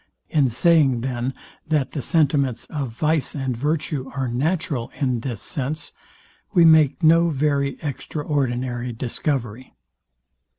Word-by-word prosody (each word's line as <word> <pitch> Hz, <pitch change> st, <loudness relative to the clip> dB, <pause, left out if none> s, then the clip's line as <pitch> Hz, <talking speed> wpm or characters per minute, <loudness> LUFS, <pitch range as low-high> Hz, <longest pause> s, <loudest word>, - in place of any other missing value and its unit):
In 145 Hz, -4 st, +3 dB
saying, 135 Hz, -1 st, +3 dB
then, 125 Hz, 0 st, -2 dB, 0.4 s
that 150 Hz, -4 st, 0 dB
the 145 Hz, -, -3 dB
sentiments 140 Hz, -6 st, +1 dB
of 140 Hz, -5 st, -3 dB
vice 150 Hz, +5 st, 0 dB
and 135 Hz, -3 st, -2 dB
virtue 145 Hz, 0 st, -2 dB
are 135 Hz, -2 st, -1 dB
natural 140 Hz, 0 st, -1 dB
in 130 Hz, -4 st, 0 dB
this 120 Hz, -2 st, -5 dB
sense, 145 Hz, +3 st, -3 dB, 0.6 s
we 170 Hz, -2 st, +7 dB
make 160 Hz, -1 st, +5 dB
no 165 Hz, +2 st, +5 dB
very 140 Hz, -2 st, 0 dB
extraordinary 130 Hz, -5 st, -2 dB
discovery. 125 Hz, 0 st, -3 dB
140 Hz, 120 wpm, -22 LUFS, 125-155 Hz, 0.6 s, we